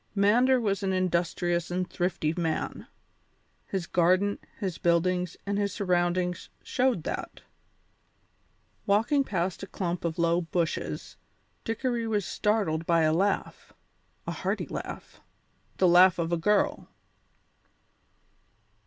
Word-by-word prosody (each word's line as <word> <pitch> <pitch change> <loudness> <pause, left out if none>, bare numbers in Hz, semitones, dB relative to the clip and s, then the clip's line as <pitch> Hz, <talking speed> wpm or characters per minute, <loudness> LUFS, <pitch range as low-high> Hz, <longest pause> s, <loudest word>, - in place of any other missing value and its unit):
Mander 240 +6 +4
was 205 -3 0
an 190 -1 0
industrious 175 -1 0
and 180 0 -1
thrifty 175 -3 -1
man. 165 -3 -2 0.8
His 190 -3 -3
garden, 185 +4 +2 0.2
his 190 -5 -3
buildings, 180 +1 +1
and 200 0 -1
his 200 -1 0
surroundings 180 -2 0
showed 250 -10 0
that. - - -5 1.4
Walking 225 +8 +3
past 185 -6 -2
a 195 - -6
clump 175 -2 -3
of 170 0 -2
low 170 +1 +2
bushes, 170 -1 -3 0.5
Dickory 235 0 -2
was 210 -4 0
startled 195 -7 0
by 170 -1 +4
a 155 0 +3
laugh 195 +4 -1 0.5
a - - -3
hearty - - -2
laugh - - -7 0.6
the 185 - +4
laugh 180 +1 +6
of 170 -1 -2
a - - +3
girl. 205 +5 +1
185 Hz, 120 wpm, -28 LUFS, 170-205 Hz, 1.4 s, laugh